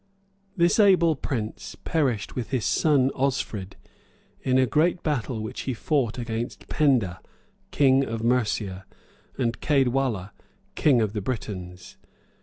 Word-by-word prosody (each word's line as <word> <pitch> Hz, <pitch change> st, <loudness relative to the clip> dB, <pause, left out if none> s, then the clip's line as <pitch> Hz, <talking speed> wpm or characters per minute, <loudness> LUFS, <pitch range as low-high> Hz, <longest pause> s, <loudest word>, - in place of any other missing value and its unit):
[] 195 Hz, 0 st, -39 dB
This 170 Hz, +4 st, +3 dB
able 180 Hz, -6 st, +5 dB
prince 115 Hz, -5 st, -5 dB
perished 130 Hz, -, -1 dB
with 125 Hz, -3 st, -4 dB
his 130 Hz, -5 st, -1 dB
son 140 Hz, -4 st, +3 dB
Osfrid, 120 Hz, -8 st, -2 dB, 0.7 s
in 130 Hz, 0 st, +2 dB
a 130 Hz, -, +4 dB
great 165 Hz, +6 st, +1 dB
battle 130 Hz, -6 st, -2 dB
which 110 Hz, -, -6 dB
he 130 Hz, -, -1 dB
fought 130 Hz, -3 st, 0 dB
against 115 Hz, 0 st, -5 dB
Penda, 125 Hz, -12 st, +1 dB, 0.5 s
king 135 Hz, -1 st, +4 dB
of 115 Hz, -3 st, -4 dB
Mercia, 105 Hz, -6 st, 0 dB, 0.5 s
and 120 Hz, -3 st, -1 dB
Caedwalla, 130 Hz, -8 st, +1 dB, 0.4 s
king 135 Hz, -6 st, +3 dB
of 105 Hz, -2 st, -1 dB
the 105 Hz, -, -2 dB
Britons. 95 Hz, -5 st, -6 dB
125 Hz, 130 wpm, -25 LUFS, 110-145 Hz, 0.7 s, able